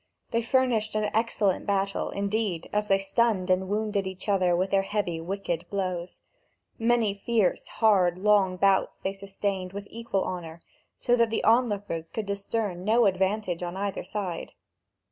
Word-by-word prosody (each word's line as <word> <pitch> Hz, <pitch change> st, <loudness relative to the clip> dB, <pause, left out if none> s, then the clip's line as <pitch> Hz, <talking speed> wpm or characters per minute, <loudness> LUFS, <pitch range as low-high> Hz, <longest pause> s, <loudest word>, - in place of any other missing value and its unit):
They 230 Hz, -, +1 dB
furnished 235 Hz, -3 st, +1 dB
an 210 Hz, -1 st, 0 dB
excellent 215 Hz, -4 st, +1 dB
battle, 195 Hz, -1 st, 0 dB
indeed, 200 Hz, -3 st, -2 dB
as 210 Hz, 0 st, +1 dB
they 195 Hz, -, +4 dB
stunned 195 Hz, -1 st, +1 dB
and 185 Hz, +1 st, +1 dB
wounded 205 Hz, -2 st, 0 dB
each 190 Hz, +2 st, -7 dB
other 185 Hz, -3 st, +3 dB
with 185 Hz, +2 st, 0 dB
their 195 Hz, -, +4 dB
heavy, 195 Hz, -5 st, -2 dB
wicked 175 Hz, -1 st, -3 dB
blows. 185 Hz, -3 st, -3 dB, 0.6 s
Many 230 Hz, -2 st, +2 dB
fierce, 205 Hz, -1 st, 0 dB
hard, 190 Hz, -6 st, +3 dB
long 195 Hz, -2 st, +3 dB
bouts 195 Hz, 0 st, +2 dB
they 195 Hz, -, -3 dB
sustained 195 Hz, -1 st, -3 dB
with 200 Hz, 0 st, -6 dB
equal 230 Hz, -4 st, -2 dB
honour, 170 Hz, -2 st, -6 dB, 0.3 s
so 245 Hz, -, +2 dB
that 235 Hz, -1 st, +3 dB
the 225 Hz, -, -1 dB
onlookers 205 Hz, -8 st, +2 dB
could 220 Hz, -, -3 dB
discern 200 Hz, -2 st, -3 dB
no 225 Hz, +3 st, +4 dB
advantage 190 Hz, -1 st, 0 dB
on 175 Hz, +1 st, -4 dB
either 200 Hz, 0 st, -2 dB
side. 190 Hz, -5 st, -4 dB
200 Hz, 155 wpm, -27 LUFS, 185-215 Hz, 0.6 s, they